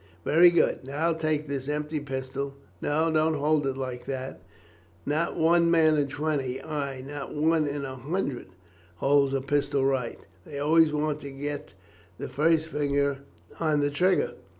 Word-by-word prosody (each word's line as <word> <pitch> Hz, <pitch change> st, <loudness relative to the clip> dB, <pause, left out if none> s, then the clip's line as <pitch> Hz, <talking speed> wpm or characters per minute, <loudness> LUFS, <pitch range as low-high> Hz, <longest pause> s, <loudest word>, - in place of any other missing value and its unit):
Very 175 Hz, +3 st, +7 dB
good! 170 Hz, -5 st, +2 dB
Now 150 Hz, +5 st, 0 dB
take 155 Hz, -2 st, -1 dB
this 140 Hz, -1 st, -4 dB
empty 150 Hz, +1 st, -2 dB
pistol 135 Hz, 0 st, -4 dB, 0.3 s
no, 160 Hz, +2 st, +1 dB
don't 155 Hz, 0 st, +2 dB
hold 150 Hz, 0 st, +1 dB
it 135 Hz, -1 st, -2 dB
like 130 Hz, -2 st, -5 dB
that! 130 Hz, -1 st, -5 dB, 0.6 s
Not 155 Hz, +4 st, -1 dB
one 170 Hz, +1 st, +4 dB
man 160 Hz, -2 st, +4 dB
in 145 Hz, -2 st, +1 dB
twenty, 145 Hz, -3 st, -2 dB
ay, 140 Hz, -4 st, -4 dB
not 145 Hz, 0 st, -6 dB
one 155 Hz, 0 st, +2 dB
in 140 Hz, 0 st, -3 dB
a 130 Hz, -1 st, -6 dB
hundred, 145 Hz, -, -3 dB, 0.5 s
holds 140 Hz, +7 st, +3 dB
a 135 Hz, -, 0 dB
pistol 140 Hz, 0 st, 0 dB
right, 130 Hz, -3 st, 0 dB, 0.3 s
they 140 Hz, -, -8 dB
always 155 Hz, +2 st, +4 dB
want 150 Hz, 0 st, -1 dB
to 140 Hz, -, -8 dB
get 145 Hz, -3 st, -6 dB, 0.4 s
the -, -, -5 dB
first 160 Hz, +1 st, +2 dB
finger 140 Hz, -2 st, 0 dB, 0.4 s
on 155 Hz, -3 st, +2 dB
the 145 Hz, 0 st, +1 dB
trigger. 190 Hz, -, +2 dB
145 Hz, 160 wpm, -27 LUFS, 135-155 Hz, 0.6 s, Very